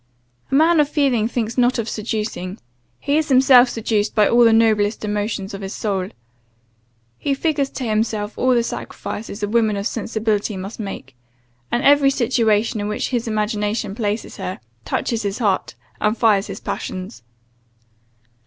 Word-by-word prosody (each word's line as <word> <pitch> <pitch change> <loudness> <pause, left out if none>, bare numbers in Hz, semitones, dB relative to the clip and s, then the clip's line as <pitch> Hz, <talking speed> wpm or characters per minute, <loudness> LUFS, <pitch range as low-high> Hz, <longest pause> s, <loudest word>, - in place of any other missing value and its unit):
A - - 0
man 320 +3 +5
of 290 -1 +3
feeling 265 -8 +2
thinks 230 0 -2
not 250 +1 +3
of 230 -2 -2
seducing, 210 -4 -4 0.4
he 285 +1 +1
is 310 - -2
himself 255 -1 +6
seduced 215 -2 -1
by 210 -1 +5
all 240 0 +5
the 230 - +6
noblest 220 -1 +2
emotions 205 -1 -3
of 195 - -6
his 195 0 -5
soul. 195 -3 -2 1.1
He 275 - 0
figures 285 -2 0
to 265 - -6
himself 215 -2 -1
all 255 0 +2
the 235 - +2
sacrifices 215 -2 -6
a - - +1
woman 220 -1 +1
of 200 - -3
sensibility 220 -2 -1
must 195 +5 -7
make, 165 - -7 0.6
and 240 - 0
every 285 0 +6
situation 230 -4 +1
in 205 - -2
which 210 - -2
his 240 -2 -2
imagination 210 -1 -1
places 210 0 -3
her, 185 - -5 0.3
touches 230 - -1
his 200 -1 -3
heart, 205 -6 0 0.2
and 215 +2 +1
fires 210 -4 +3
his - - -7
passions. 185 -12 -5
220 Hz, 160 wpm, -20 LUFS, 205-245 Hz, 1.1 s, himself